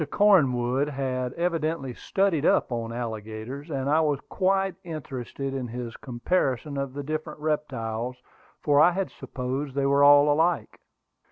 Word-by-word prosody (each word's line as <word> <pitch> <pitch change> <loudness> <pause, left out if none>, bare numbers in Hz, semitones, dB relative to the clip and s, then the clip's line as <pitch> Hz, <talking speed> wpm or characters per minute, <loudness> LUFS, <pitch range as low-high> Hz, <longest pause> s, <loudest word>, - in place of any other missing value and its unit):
Cornwood 140 - +3
had 130 -3 -2
evidently 165 -5 -1
"studied 190 +1 0
up" - - +3
on 115 -1 -3
alligators; 115 +4 -6
and 135 -3 -2
I 155 +3 +4
was 145 -3 +1
quite 195 0 +1
interested 135 -4 -5
in 130 -2 -3
his 120 0 -6
comparison 135 +2 -1
of 140 -1 -3
the 145 - -4
different 155 +1 -4
reptiles, 125 -6 -2 0.5
for 145 -1 +4
I 175 - +6
had 190 0 -2
supposed 135 +1 -5
they 140 -1 +1
were 140 +1 +4
all 145 +1 +7
alike. 165 +3 0
140 Hz, 145 wpm, -26 LUFS, 125-155 Hz, 0.5 s, all